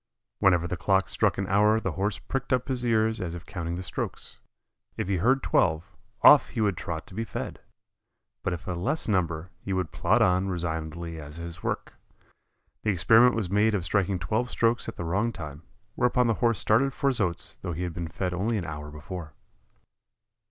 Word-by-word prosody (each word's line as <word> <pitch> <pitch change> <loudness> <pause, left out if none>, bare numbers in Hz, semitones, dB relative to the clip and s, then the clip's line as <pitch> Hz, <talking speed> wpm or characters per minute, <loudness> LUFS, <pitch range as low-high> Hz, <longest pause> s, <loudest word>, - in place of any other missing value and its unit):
Whenever 90 -4 +4
the 90 - -2
clock 95 +3 +2
struck 95 +2 +1
an 100 - -1
hour 105 +3 +4
the - - -2
Horse 100 -1 -1
pricked 135 +8 -4
up 125 +1 +1
his 125 -2 -1
ears 110 -1 +2
as 85 -2 -3
if 85 - -9
counting 85 -3 -4
the 90 - -5
strokes. 95 - -4 0.6
If - - -2
he 95 -1 +1
heard 130 +9 +2
twelve, 80 -1 +1 0.3
off 150 - +8
he 120 - -5
would 105 -3 +2
trot 80 -1 -5
to - - -15
be 110 +4 -2
fed, 115 - -5 0.8
but - - -1
if 85 0 -5
a - - -1
less 100 - -1
number 90 -4 0
he 95 - -4
would 90 -4 -1
plod - - +3
on 90 +1 +2
resignedly 85 -2 -4
at 75 0 -10
his 85 -1 -8
work. - - -3 0.9
The 110 - -1
experiment 115 +6 +5
was 105 -5 -2
made 105 +2 +3
of 90 -4 -1
striking 95 0 +1
twelve 110 - -1
strokes 115 0 +1
at - - -8
the 85 - -5
wrong 100 +8 +1
time, 75 -6 -8 0.3
whereupon 125 +1 +2
the 115 - +3
Horse 115 -3 +3
started 130 +5 +3
for 140 - 0
his 125 -4 +1
oats 85 -4 -2
though 85 - -5
he 85 +3 -3
had 90 -2 -3
been 85 0 -4
fed 90 +3 -3
only 105 +6 0
an 95 - -3
hour 75 -1 -6
before. 75 +1 -8
95 Hz, 200 wpm, -27 LUFS, 85-110 Hz, 0.9 s, off